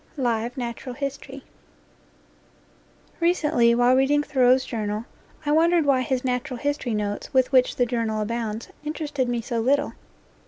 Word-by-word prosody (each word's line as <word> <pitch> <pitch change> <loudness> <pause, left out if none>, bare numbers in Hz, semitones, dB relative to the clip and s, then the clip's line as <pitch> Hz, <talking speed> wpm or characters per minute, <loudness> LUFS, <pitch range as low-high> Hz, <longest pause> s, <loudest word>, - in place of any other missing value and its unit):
LIVE 240 -1 -1
NATURAL 245 +1 -5
HISTORY 275 0 -6 1.8
RECENTLY, 300 -9 +3
while 245 +1 +4
reading 285 +3 +3
Thoreau's 260 -2 +3
Journal, 215 -1 -3 0.4
I 295 - +1
wondered 330 +1 +4
why 270 -2 +3
his 255 0 -2
natural 250 +1 -2
history 285 -4 -2
notes, 205 -1 -3
with 260 -1 +3
which 255 -2 +3
the 245 - +2
Journal 230 -3 -1
abounds, 225 0 -3
interested 295 -4 -2
me 240 -1 -1
so 235 0 -3
little. 280 +5 +1
255 Hz, 135 wpm, -24 LUFS, 235-285 Hz, 1.8 s, while